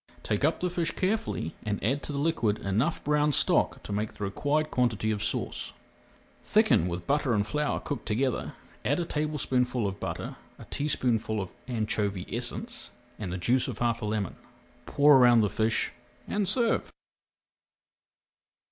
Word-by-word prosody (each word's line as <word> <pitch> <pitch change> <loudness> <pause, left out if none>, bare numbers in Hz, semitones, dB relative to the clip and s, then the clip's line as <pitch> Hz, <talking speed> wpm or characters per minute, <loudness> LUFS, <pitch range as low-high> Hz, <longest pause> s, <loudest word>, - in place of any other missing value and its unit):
Take 105 +3 -1
up 155 +3 +2
the 180 -1 -1
fish 170 -2 0
carefully 195 - -1
and 105 -2 -2
add 135 +7 +1
to - - -3
the 140 - -3
liquid 140 -9 +1
enough 110 - 0
brown 150 0 +2
stock - - +2
to - - -7
make 105 +1 -2
the - - -6
required 145 +10 0
quantity 115 -3 +1
of 105 -1 -2
sauce. - - -3 0.7
Thicken 85 - +3
with 85 0 -4
butter 140 -4 +2
and 100 -1 +1
flour 150 +7 -1
cooked 145 - -5
together, 125 +3 0 0.3
add 145 +6 +1
a 175 - -1
tablespoonful 130 -6 0
of 95 0 -5
butter, - - -4 0.2
a - - -11
teaspoonful 120 -7 0
of 95 -2 -3 0.2
anchovy 105 -5 -1
essence, 225 - -3 0.3
and 100 -5 -4
the 90 - -2
juice 120 +8 +2
of - - -4
half 120 -1 0
a - - -3
lemon. 105 -3 -2 0.5
Pour 145 -1 +6
around 120 -2 +7
the 105 -1 +1
fish 110 +1 +1 0.4
and 205 -2 0
serve. 230 +3 +1
120 Hz, 160 wpm, -28 LUFS, 105-150 Hz, 0.7 s, around